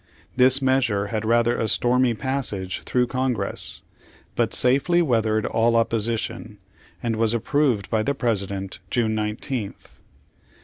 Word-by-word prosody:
This 130 +2 +6
measure 120 -7 +1
had 110 0 -2
rather 120 +1 +2
a 110 - 0
stormy 125 +2 +2
pas 135 +3 -2
sage 95 -2 -4
through 125 -1 +2
Congress, 125 -5 -3 0.5
but - - 0
safely 140 +8 +3
weathered 110 -8 +1
all 115 +1 +1
opposition, 115 -1 -1 0.5
and 115 -2 -1
was 115 +1 +1
approved 120 -3 0
by 110 -2 +2
the 140 +6 -1
President 100 -6 -3
June 110 -3 0
19th. 105 +1 -5
115 Hz, 130 wpm, -23 LUFS, 110-130 Hz, 0.5 s, This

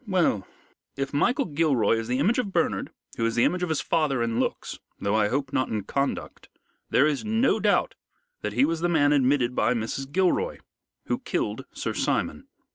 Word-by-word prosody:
"Well, 175 - +1 0.5
if 135 +1 -3
Michael 250 - +2
Gilroy 145 -8 +2
is 115 - -5
the 125 +1 0
image 200 - +2
of 205 -6 -2
Bernard, - - 0 0.3
who 115 - 0
is 115 - -2
the 120 - +3
image 180 - +1
of 180 - -1
his 160 - 0
father 145 -7 +1
in 115 0 -1
looks, - - -3 0.2
though 100 +1 -1
I 110 -1 +3
hope 135 +3 -2
not 130 - +1
in 105 -2 -2
conduct, 140 +6 -3 0.4
there 140 - +4
is 150 -2 0
no 225 +4 +2
doubt - - +2 0.5
that - - -3
he 270 - +4
was 165 -1 -1
the 175 +1 0
man 145 -3 +3
admitted 130 -3 +2
by 120 +1 +2
Mrs. 125 +4 -4
Gilroy, 190 - +1 0.5
who - - -1
killed - - -3
Sir - - -3
Simon. - - -1
145 Hz, 195 wpm, -26 LUFS, 120-175 Hz, 0.5 s, there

